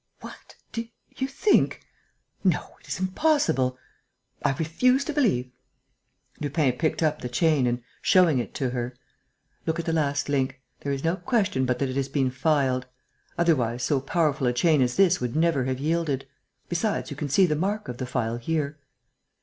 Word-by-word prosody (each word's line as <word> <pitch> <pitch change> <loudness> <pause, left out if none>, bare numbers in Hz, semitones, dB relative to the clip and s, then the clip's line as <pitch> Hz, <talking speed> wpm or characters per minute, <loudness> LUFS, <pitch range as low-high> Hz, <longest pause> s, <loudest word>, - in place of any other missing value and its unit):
"What!... - - -12 0.2
Do 230 0 -4 0.3
you 265 - -1
think?... 340 +10 +2 0.6
No, - - 0
it - - -20
is - - -3
impossible.... 185 - +1 0.7
I - - +2
refuse 250 - +2
to 310 - -3
believe...." 185 - +1 0.9
Lupin 145 -1 +1
picked 155 +5 -1
up 150 -1 +1
the 125 - -4
chain 140 +1 +2
and, 120 0 -1 0.2
showing 175 -8 +4
it 120 - -5
to 130 -3 -1
her: 125 0 -3 0.7
"Look 160 +1 0
at 170 - -3
the 165 - 0
last 145 -2 0
link. 135 -2 0 0.2
There 140 - -3
is 140 -1 -3
no 165 +3 +1
question 195 - 0
but 125 0 +1
that 135 0 -1
it 130 - -3
has 135 0 -1
been 135 -2 +1
filed. 130 -2 +1 0.5
Otherwise, 125 -8 +1
so 145 -3 +2
powerful 150 -2 +1
a 125 - +2
chain 155 +3 +3
as 125 -1 +1
this 185 -2 +4
would 125 +1 -2
never 160 -5 +2
have 130 0 -1
yielded. 150 -2 -1 0.4
Besides, 175 0 -1
you - - -4
can 150 0 -4
see 190 +8 +5
the 155 -4 +1
mark 200 +7 -1
of 125 -1 -6
the 130 - -3
file 115 -2 -1
here." 150 +3 -2
145 Hz, 180 wpm, -26 LUFS, 130-170 Hz, 0.9 s, see